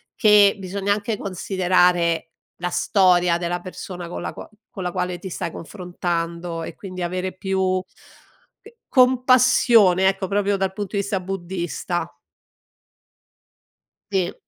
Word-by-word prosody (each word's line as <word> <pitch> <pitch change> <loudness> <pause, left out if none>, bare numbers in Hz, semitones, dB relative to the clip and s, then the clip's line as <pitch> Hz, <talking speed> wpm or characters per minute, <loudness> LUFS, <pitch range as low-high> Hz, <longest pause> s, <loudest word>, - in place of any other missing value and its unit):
che 210 -2 +6
bisogna 195 +1 -1
anche 210 +1 -3
considerare 180 -3 +1 0.3
la 180 +1 -3
storia 180 -2 +3
della 175 0 -2
persona 180 -1 -8
con 170 - -6
la - - -4
qua - - -10 0.2
con 195 -5 -7
la 180 - -2
quale 180 0 -2
ti 190 +2 -8
stai 170 -1 -4
confrontando 170 -2 -4
e - - -7
quindi 185 -2 -8
avere 185 +2 -3
più 190 -1 0 0.8
c 445 - -15 0.2
compassione 250 -7 +5
ecco, 195 0 0
proprio 200 +1 +1
dal 190 -1 -1
punto 200 0 -6
di 200 - +2
vista 200 -1 -2
buddista. 175 -2 -4 2.0
Sì. 185 -3 0
185 Hz, 130 wpm, -22 LUFS, 175-200 Hz, 2.0 s, che